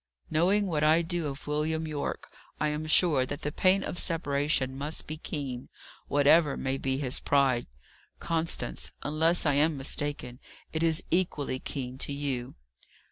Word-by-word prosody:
"Knowing 185 Hz, +6 st, +3 dB
what 155 Hz, -5 st, -1 dB
I 160 Hz, +2 st, +5 dB
do 170 Hz, -2 st, -2 dB
of 140 Hz, 0 st, -7 dB
William 155 Hz, +2 st, -1 dB
Yorke, 150 Hz, -2 st, -4 dB, 0.3 s
I 150 Hz, -, +1 dB
am 150 Hz, +1 st, -3 dB
sure 155 Hz, -4 st, +5 dB
that 145 Hz, +4 st, -6 dB
the 150 Hz, -, -2 dB
pain 185 Hz, +4 st, +3 dB
of 175 Hz, -, -3 dB
separation 145 Hz, -4 st, +1 dB
must 145 Hz, +3 st, -4 dB
be 155 Hz, -, -5 dB
keen, 140 Hz, -5 st, -5 dB, 0.4 s
whatever 145 Hz, +1 st, +4 dB
may 135 Hz, 0 st, -2 dB
be 130 Hz, 0 st, -1 dB
his 130 Hz, -3 st, +1 dB
pride. 135 Hz, -4 st, +2 dB, 0.5 s
Constance, 165 Hz, -, -2 dB
unless 160 Hz, +4 st, +2 dB
I 145 Hz, -, +3 dB
am 150 Hz, +2 st, +2 dB
mistaken, 135 Hz, -2 st, -3 dB, 0.3 s
it 160 Hz, -, -1 dB
is 165 Hz, -1 st, +2 dB
equally 155 Hz, -7 st, 0 dB
keen 130 Hz, -2 st, -5 dB
to 140 Hz, -, -1 dB
you." 135 Hz, -3 st, -3 dB
150 Hz, 155 wpm, -28 LUFS, 140-160 Hz, 0.5 s, I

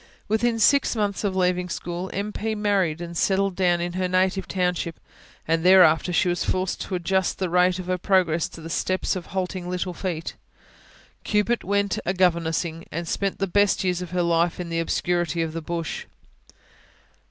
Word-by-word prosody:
Within 225 Hz, +2 st, +1 dB
six 280 Hz, +4 st, +3 dB
months 205 Hz, -2 st, -1 dB
of 195 Hz, -2 st, -1 dB
leaving 180 Hz, -1 st, +1 dB
school, 175 Hz, +2 st, -4 dB
M. 205 Hz, +2 st, -3 dB
P. 220 Hz, 0 st, -2 dB
married 195 Hz, -6 st, 0 dB
and 170 Hz, 0 st, -6 dB
settled 195 Hz, +2 st, +1 dB
down 175 Hz, -2 st, +2 dB
in 175 Hz, 0 st, -3 dB
her 185 Hz, 0 st, -1 dB
native 185 Hz, +1 st, +1 dB
township; 180 Hz, -3 st, -1 dB, 0.5 s
and 165 Hz, 0 st, +1 dB
thereafter 180 Hz, -3 st, +6 dB
she 180 Hz, +2 st, +2 dB
was 175 Hz, 0 st, 0 dB
forced 185 Hz, 0 st, -1 dB
to 190 Hz, -, -3 dB
adjust 190 Hz, +1 st, 0 dB
the 185 Hz, -3 st, -2 dB
rate 180 Hz, 0 st, +3 dB
of 185 Hz, -, -6 dB
her 185 Hz, 0 st, -1 dB
progress 175 Hz, -4 st, +2 dB
to 165 Hz, -, -11 dB
the 165 Hz, -, -8 dB
steps 185 Hz, +3 st, 0 dB
of 185 Hz, -, -6 dB
halting 185 Hz, -1 st, -3 dB
little 180 Hz, 0 st, -2 dB
feet. 170 Hz, -3 st, -4 dB, 0.9 s
Cupid 210 Hz, +3 st, +1 dB
went 200 Hz, +1 st, 0 dB
a 185 Hz, -, -1 dB
governessing, 170 Hz, -2 st, 0 dB
and 170 Hz, +2 st, -4 dB
spent 195 Hz, +3 st, -1 dB
the 195 Hz, -, 0 dB
best 205 Hz, +2 st, +2 dB
years 180 Hz, -1 st, 0 dB
of 180 Hz, -, -6 dB
her 180 Hz, 0 st, 0 dB
life 170 Hz, 0 st, +1 dB
in 175 Hz, -1 st, -4 dB
the 165 Hz, 0 st, -1 dB
obscurity 170 Hz, -1 st, 0 dB
of 160 Hz, -1 st, -4 dB
the 165 Hz, -, -4 dB
bush. 165 Hz, 0 st, -4 dB
180 Hz, 185 wpm, -24 LUFS, 170-190 Hz, 0.9 s, thereafter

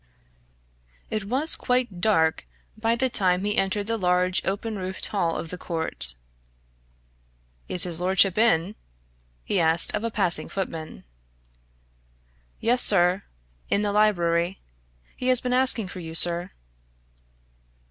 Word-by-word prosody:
It 215 Hz, -2 st, -3 dB
was 270 Hz, +9 st, +3 dB
quite 245 Hz, -8 st, -2 dB
dark 160 Hz, -6 st, +1 dB, 0.3 s
by 225 Hz, +1 st, -1 dB
the 260 Hz, +2 st, 0 dB
time 185 Hz, -6 st, 0 dB
he 205 Hz, 0 st, -1 dB
entered 195 Hz, +1 st, -1 dB
the 225 Hz, +1 st, -3 dB
large 180 Hz, 0 st, +1 dB
open 205 Hz, +2 st, -4 dB
roofed 185 Hz, 0 st, -4 dB
hall 170 Hz, -5 st, -2 dB
of 165 Hz, -, -7 dB
the 180 Hz, -, -7 dB
Court. 160 Hz, -, -1 dB, 1.5 s
"Is 180 Hz, -, +3 dB
his 175 Hz, -1 st, -2 dB
lordship 190 Hz, 0 st, +5 dB
in?" 210 Hz, -4 st, +1 dB, 0.7 s
he 195 Hz, -, -1 dB
asked 165 Hz, 0 st, +3 dB
of 210 Hz, -, -3 dB
a 230 Hz, -, -2 dB
passing 195 Hz, -6 st, 0 dB
footman. 165 Hz, -, -6 dB, 1.6 s
"Yes, 245 Hz, +2 st, +1 dB
sir 180 Hz, -1 st, +5 dB, 0.5 s
in 205 Hz, -, 0 dB
the 205 Hz, -, -1 dB
library. 175 Hz, -4 st, 0 dB, 0.6 s
He 255 Hz, -, -5 dB
has 255 Hz, -1 st, +3 dB
been 250 Hz, 0 st, -3 dB
asking 250 Hz, -5 st, 0 dB
for 185 Hz, -, -9 dB
you, 165 Hz, -2 st, -8 dB
sir." 175 Hz, +1 st, +4 dB
190 Hz, 130 wpm, -24 LUFS, 175-220 Hz, 1.6 s, lordship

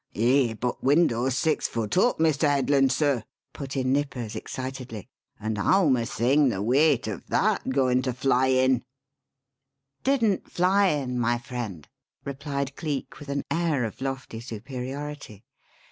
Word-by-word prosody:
"Eh, 120 Hz, +1 st, +3 dB
but 125 Hz, +2 st, -3 dB
window's 130 Hz, -4 st, +3 dB
six 160 Hz, +1 st, +1 dB
foot 110 Hz, -3 st, -3 dB
up, 220 Hz, +7 st, +3 dB
Mr. 155 Hz, -2 st, +2 dB
Headland, 140 Hz, -1 st, +3 dB
sir," 135 Hz, -4 st, +1 dB, 0.3 s
put 135 Hz, -1 st, -6 dB
in 130 Hz, 0 st, +1 dB
Nippers 135 Hz, -6 st, -2 dB
excitedly; 130 Hz, -5 st, -6 dB, 0.3 s
"and 110 Hz, 0 st, -3 dB
howm 160 Hz, -, +4 dB
a 115 Hz, -2 st, -2 dB
thing 135 Hz, +4 st, +3 dB
the 100 Hz, -, -2 dB
weight 130 Hz, +4 st, +3 dB
o' 105 Hz, -5 st, -4 dB
that -, -, +1 dB
goin' 130 Hz, -1 st, +2 dB
to 130 Hz, 0 st, -1 dB
fly 130 Hz, +1 st, +2 dB
in?" 130 Hz, -1 st, +3 dB, 1.2 s
"Didn't 230 Hz, -8 st, +1 dB
fly 190 Hz, +3 st, +3 dB
in, 135 Hz, -7 st, -1 dB
my 120 Hz, 0 st, +1 dB
friend," 115 Hz, -, -6 dB, 0.4 s
replied 140 Hz, 0 st, -4 dB
Cleek 150 Hz, -5 st, -4 dB
with 145 Hz, -1 st, -10 dB
an 140 Hz, 0 st, -1 dB
air 160 Hz, -6 st, +1 dB
of 110 Hz, -, -7 dB
lofty 130 Hz, -4 st, -4 dB
superiority. 130 Hz, 0 st, -7 dB
130 Hz, 145 wpm, -26 LUFS, 120-145 Hz, 1.2 s, howm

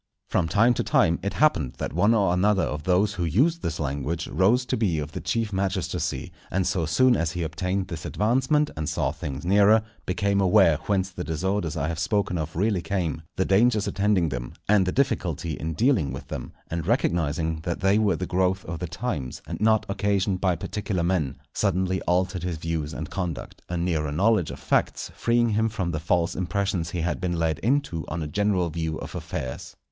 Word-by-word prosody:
From 90 Hz, -4 st, +1 dB
time 115 Hz, +7 st, +4 dB
to -, -, -1 dB
time 85 Hz, +1 st, +3 dB
it 100 Hz, -, -2 dB
happened 80 Hz, -, +2 dB
that 65 Hz, -, -5 dB
one 105 Hz, +7 st, +4 dB
or 100 Hz, -5 st, +3 dB
another 95 Hz, +2 st, +3 dB
of 75 Hz, 0 st, -3 dB
those 95 Hz, +3 st, +2 dB
who 90 Hz, -, -3 dB
used 140 Hz, -, +2 dB
this 80 Hz, -, -3 dB
language 75 Hz, +3 st, -2 dB
rose 115 Hz, +7 st, +3 dB
to -, -, -1 dB
be 100 Hz, -8 st, +1 dB
of 75 Hz, -1 st, -4 dB
the -, -, -5 dB
chief 115 Hz, -3 st, -1 dB
magistracy, 95 Hz, -8 st, -2 dB, 0.2 s
and 95 Hz, 0 st, 0 dB
so 85 Hz, -4 st, 0 dB
soon 125 Hz, +10 st, +4 dB
as 85 Hz, -5 st, -1 dB
he 90 Hz, -1 st, -2 dB
obtained 90 Hz, +4 st, -2 dB
this 80 Hz, -3 st, -6 dB
advancement, 130 Hz, -, +1 dB
and 75 Hz, 0 st, -3 dB
saw -, -, 0 dB
things 70 Hz, +2 st, -6 dB
nearer, 105 Hz, +3 st, +5 dB, 0.2 s
became 100 Hz, +2 st, +1 dB
aware 95 Hz, -4 st, +5 dB
whence 95 Hz, -2 st, +1 dB
the -, -, -5 dB
disorders 85 Hz, +2 st, -1 dB
I 70 Hz, -, -1 dB
have 80 Hz, -1 st, -3 dB
spoken 90 Hz, 0 st, 0 dB
of 80 Hz, +3 st, -4 dB
really 100 Hz, -1 st, +1 dB
came, 85 Hz, -5 st, -2 dB
the 95 Hz, -, +1 dB
dangers 105 Hz, +1 st, +3 dB
attending 100 Hz, -4 st, +2 dB
them, 60 Hz, -3 st, -5 dB
and 100 Hz, -3 st, +4 dB
the -, -, +1 dB
difficulty 85 Hz, -, 0 dB
in 80 Hz, +1 st, -4 dB
dealing 115 Hz, -, +2 dB
with 65 Hz, 0 st, -8 dB
them; -, -, -5 dB, 0.2 s
and 85 Hz, 0 st, -3 dB
recognizing 80 Hz, -, 0 dB
that 85 Hz, +2 st, -4 dB
they 95 Hz, +3 st, +4 dB
were 105 Hz, -5 st, +2 dB
the 90 Hz, -, -3 dB
growth 95 Hz, +1 st, 0 dB
of 85 Hz, -2 st, -5 dB
the 90 Hz, -, -3 dB
times, 90 Hz, -, -4 dB
and -, -, -6 dB
not 110 Hz, 0 st, +3 dB
occasioned 100 Hz, -1 st, 0 dB
by 90 Hz, -3 st, +2 dB
particular 95 Hz, +1 st, -3 dB
men, 85 Hz, -7 st, 0 dB, 0.2 s
suddenly 95 Hz, -1 st, 0 dB
altered 90 Hz, 0 st, +1 dB
his 90 Hz, -2 st, -3 dB
views 80 Hz, -1 st, -3 dB
and 80 Hz, -2 st, -6 dB
conduct; 90 Hz, -5 st, -4 dB
a 90 Hz, -, -2 dB
nearer 80 Hz, -4 st, 0 dB
knowledge 100 Hz, +2 st, +2 dB
of -, -, -6 dB
facts -, -, 0 dB
freeing 120 Hz, 0 st, +2 dB
him 110 Hz, +1 st, +1 dB
from 95 Hz, -5 st, -2 dB
the 75 Hz, -, -2 dB
false 85 Hz, +1 st, +1 dB
impressions 95 Hz, -2 st, -1 dB
he 85 Hz, 0 st, -3 dB
had 85 Hz, -, -2 dB
been 90 Hz, -2 st, -1 dB
led 80 Hz, -2 st, 0 dB
into 115 Hz, -, 0 dB
on 80 Hz, 0 st, -3 dB
a -, -, -4 dB
general 95 Hz, 0 st, +1 dB
view 80 Hz, -1 st, -2 dB
of -, -, -7 dB
affairs. 80 Hz, -6 st, -5 dB
90 Hz, 205 wpm, -25 LUFS, 80-100 Hz, 0.2 s, nearer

